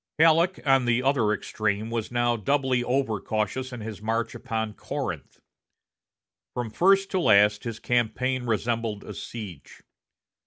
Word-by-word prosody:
Halleck, 165 +3 +4
on 135 -2 +4
the 120 +1 +2
other 130 -6 +2
extreme, 110 +1 -2
was 115 -1 -3
now 120 0 +2
doubly 130 +2 +1
over 125 -4 0
cautious 110 +5 -2
in 125 -2 -7
his 105 -1 -7
march 115 +2 -1
upon 110 -3 -3
Corinth. - - -5 1.2
From 120 -3 -3
first 195 - +3
to 190 - +1
last, 105 - +4
his 115 -2 -4
campaign 125 +2 0
resembled 115 -2 -1
a - - -8
siege. 100 -10 -9
120 Hz, 140 wpm, -26 LUFS, 110-130 Hz, 1.2 s, Halleck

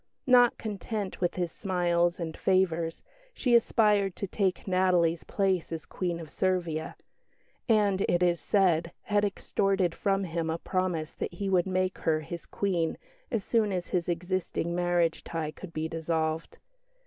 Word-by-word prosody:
Not 245 -2 +6
content 210 -2 -4
with 175 - 0
his 175 -2 -1
smiles 175 -2 +1
and 160 -2 -4
favours 170 -3 +1 0.3
she 250 -2 +1
aspired 210 -4 +3
to 200 - -3
take 190 -1 -1
Natalie's 180 -3 +2
place 190 -4 0
as 160 -2 -5
Queen 175 -2 -3
of 160 -3 -9
Servia; 175 -4 -1 0.7
and, 205 -3 +3
it 175 +1 +2
is 175 -1 +2
said, 175 -4 +2
had 205 -1 +1
extorted 195 -2 0
from 195 +1 0
him 165 -2 -2
a 160 - -1
promise 180 -3 -1
that - - -5
he 195 +2 -2
would 180 -1 +3
make 185 0 0
her 155 -1 +1
his 170 +3 -7
Queen 175 -5 -1 0.3
as 225 -5 -1
soon 220 -2 +1
as 180 -2 -3
his 175 -1 -1
existing 175 0 -2
marriage 175 -1 +1
tie 160 -2 -3
could 180 +2 -10
be 160 0 -2
dissolved. 160 0 -2
180 Hz, 155 wpm, -29 LUFS, 165-195 Hz, 0.7 s, Not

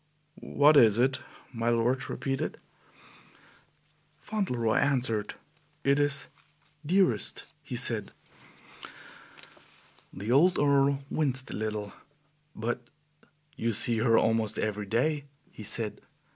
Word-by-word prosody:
"What 145 +1 +3
is 110 -5 +6
it?" 130 +2 +2 0.3
my 115 0 -1
lord 120 +3 0
repeated. 135 -1 -3 1.6
Fauntleroy 125 - -1
answered. 120 -7 0 0.5
"It 140 +1 +3
is 145 -1 +1 0.6
Dearest," 165 - +1 0.2
he - - -7
said. - - +2 2.0
The 105 +4 -5
old 175 +8 +4
Earl 140 -1 +2
winced 130 -4 -1
a - - -5
little. 105 -2 -4 0.6
"But 120 +2 -4 0.7
you 115 0 -1
see 115 +2 +3
her 115 -1 +3
almost 110 -1 +1
every 105 -1 -2
day," 145 +7 0 0.3
he - - -12
said. 105 +1 -3
120 Hz, 105 wpm, -28 LUFS, 110-140 Hz, 2.0 s, is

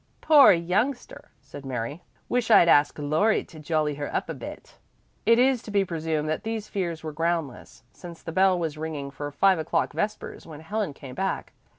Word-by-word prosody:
"Poor 300 -3 +7
youngster!" 195 +10 -1
said 140 +1 -11
Mary. 135 +4 -4 0.3
"Wish 245 -2 -1
I'd 170 - +7
asked 145 -3 +4
Laurie 155 +9 +1
to 160 - -14
jolly 155 -1 0
her 145 0 -5
up - - -2
a - - -2
bit." - - -10 0.5
It 230 0 +6
is 255 -1 +3
to 230 - -11
be 200 -1 +2
presumed 160 -3 -2
that 155 - -2
these 220 -1 -4
fears 170 -5 -3
were 155 -1 -5
groundless, 165 -4 -3
since 170 -2 -12
the 165 - -5
bell 185 +2 +3
was 160 -3 -3
ringing 150 -3 -5
for 145 +1 -6
five 190 +4 +3
o'clock 160 - -1
vespers 210 -4 -4
when 155 -2 -10
Helen 200 -1 -3
came 135 -2 -10
back. 190 +8 -3
165 Hz, 190 wpm, -25 LUFS, 150-200 Hz, 0.5 s, Poor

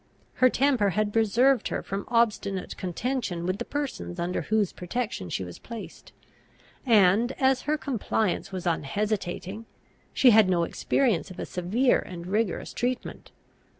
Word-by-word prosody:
Her 255 - +7
temper 255 -6 +2
had 210 -1 +1
preserved 235 +3 +3
her - - -3
from 195 +1 -4
obstinate 215 -5 0
contention 185 -1 -3
with 185 +3 -1
the 240 - -3
persons 280 -11 -4
under 175 +1 -1
whose 215 -3 0
protection 180 - -4
she 95 - -2
was 90 -1 -9
placed; 230 -3 -9 0.8
and, 220 +2 +4
as 265 -1 +2
her 305 - +2
compliance 220 -8 -1
was 185 -1 -5
unhesitating, 195 +4 -2 0.4
she 255 - +5
had 215 -3 +6
no 175 -2 +2
experience 225 +3 0
of 185 - -11
a - - -4
severe 205 +9 +1
and 175 -1 -8
rigorous 200 0 -1
treatment. 245 +1 -3
210 Hz, 145 wpm, -27 LUFS, 180-245 Hz, 0.8 s, Her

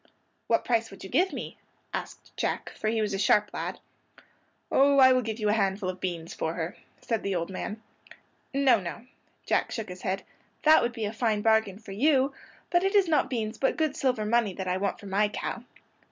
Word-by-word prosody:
"What - - +2
price 230 -2 +1
would 195 - -12
you 190 - -9
give 370 +3 +3
me?" - - -7 0.3
asked - - -7
Jack, - - -2
for 215 - -4
he 220 0 +1
was 210 - -2
a 195 - -1
sharp 210 +1 +3
lad. - - -4 0.9
"Oh, 280 +1 +5
I 260 -1 +8
will 255 - +3
give 220 -2 -4
you 210 -1 +1
a - - +4
handful 195 -2 0
of 185 - -13
beans 170 -3 -4
for 160 +1 -2
her," 175 +4 -3 0.3
said 225 -3 -1
the 195 -1 -2
old 170 +2 -2
man. 210 +3 -5 0.7
"No, 270 -4 +4
no," 190 +5 -7 0.4
Jack - - +1
shook 225 -5 -4
his 180 0 -8
head. 190 +1 -2 0.4
"That 310 0 +7
would 240 - 0
be 225 -2 -3
a 205 - -3
fine 220 -2 0
bargain 220 -3 +3
for 215 -2 -11
you; 270 +5 +3 0.4
but 350 0 +3
it 390 +2 +1
is 395 -3 +5
not 305 -4 +2
beans 225 -3 -3
but 270 - +1
good 310 -3 0
silver 250 -5 0
money 215 -3 +1
that 190 -1 -4
I 180 0 +1
want 200 +1 -2
for 210 - -12
my 200 +2 +2
cow." 235 +3 -5
220 Hz, 215 wpm, -28 LUFS, 195-255 Hz, 0.9 s, I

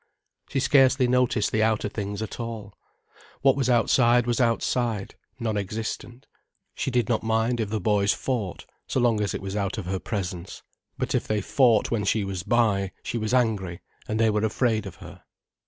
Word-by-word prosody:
She 140 - 0
scarcely 135 -1 +4
noticed 125 -4 +2
the 110 - +1
outer 110 -1 +1
things 105 0 -4
at 110 - -7
all. 110 -4 -6 0.7
What 135 -1 +5
was 135 -3 0
outside 120 0 +4
was 120 0 0
outside, 115 -3 0 0.3
non 110 -3 -1
existent. 110 +4 -5 0.5
She - - -2
did 120 -4 +1
not 115 -3 +1
mind 115 +2 0
if 110 -3 -1
the 110 0 -1
boys 100 +1 +2
fought, 115 -9 -3 0.2
so - - 0
long 115 -3 +2
as 105 - -1
it - - -5
was 95 0 -4
out 100 +1 -2
of 105 - -4
her 95 +1 -2
presence. 90 -4 -5 0.3
But - - -2
if - - 0
they 110 -1 0
fought 115 0 +3
when 115 -3 0
she 105 +1 +1
was 95 -2 -4
by, 100 -2 +1
she 120 - -3
was 110 0 -2
angry, 105 -9 0 0.3
and 110 +1 -2
they 110 -1 +4
were 105 0 0
afraid 110 -1 0
of 95 - -9
her. - - -12
110 Hz, 190 wpm, -25 LUFS, 100-120 Hz, 0.7 s, What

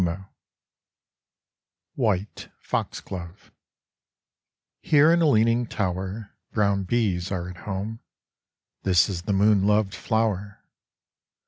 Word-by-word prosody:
89 90 +2 -2 1.7
WHITE 105 -5 -2
FOXGLOVE 90 +1 -5 1.3
Here 150 +1 +5
in 170 - +3
a 165 - +4
leaning 115 0 +3
tower 95 +2 -3 0.2
Brown 100 -3 +1
bees 95 -5 0
are 90 -2 -3
at 90 -1 -9
home. 105 +3 -4 0.8
This 90 -3 +4
is 90 -3 -3
the 100 +3 -2
moon 100 0 +3
loved 105 -1 +2
flower. 105 -3 -2
100 Hz, 100 wpm, -25 LUFS, 95-110 Hz, 1.7 s, Here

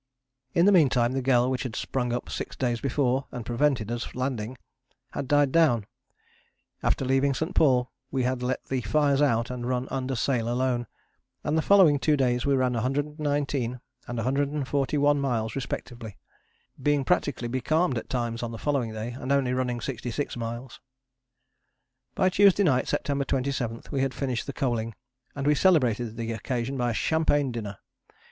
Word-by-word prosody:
In 170 - +5
the 205 - +6
meantime 130 -9 +4
the 135 0 -1
gale 125 -1 +3
which 130 - -1
had 120 -4 -4
sprung 125 -2 -2
up 120 0 -3
six - - -5
days 120 -2 -1
before 135 -1 0
and 120 -3 -6
prevented 120 -2 +1
us 120 0 -4
landing 125 -2 -3 0.5
had 140 - -4
died 145 -1 +3
down. 135 -10 +3 1.0
After 135 - +1
leaving 135 +1 +2
St. 160 +6 -2
Paul 125 -5 +3 0.2
we 130 -1 -1
had 125 0 -1
let 125 +1 -2
the 130 -1 -2
fires 140 +5 +2
out 120 -4 +2
and 120 -1 -4
run 125 0 -1
under 130 0 -2
sail 115 0 0
alone, 120 -1 0 0.6
and 150 - 0
the 160 - +3
following 175 -6 +5
two 150 +1 +2
days 125 -1 +1
we 140 - +3
ran 130 -1 +1
119 145 0 -1 0.3
and 120 - -4
141 140 +3 +1
miles 115 -5 -1
respectively, 120 -4 -5 0.6
being 145 0 +2
practically 145 -9 0
becalmed 130 +2 +1
at - - -12
times 120 -2 -2
on 120 -1 -3
the 115 - -6
following 135 -4 -1
day, 110 +2 -4
and 130 +2 -5
only 135 -3 +2
running 125 -1 -1
66 125 +3 -4
miles. 120 +2 -6 1.3
By 185 - +3
Tuesday 200 +1 +5
night, 130 -8 +2
September 140 0 -1
27, 125 -4 -2
we 140 -3 0
had 135 -1 -1
finished 130 -4 -2
the - - -2
coaling, 115 -5 -2 0.4
and 140 -1 -3
we 150 - +5
celebrated 125 - +2
the 115 0 -3
occasion 120 +3 -3
by 120 -2 0
a - - -1
champagne 145 -3 +1
dinner. 105 -4 -5
130 Hz, 165 wpm, -27 LUFS, 120-140 Hz, 1.3 s, the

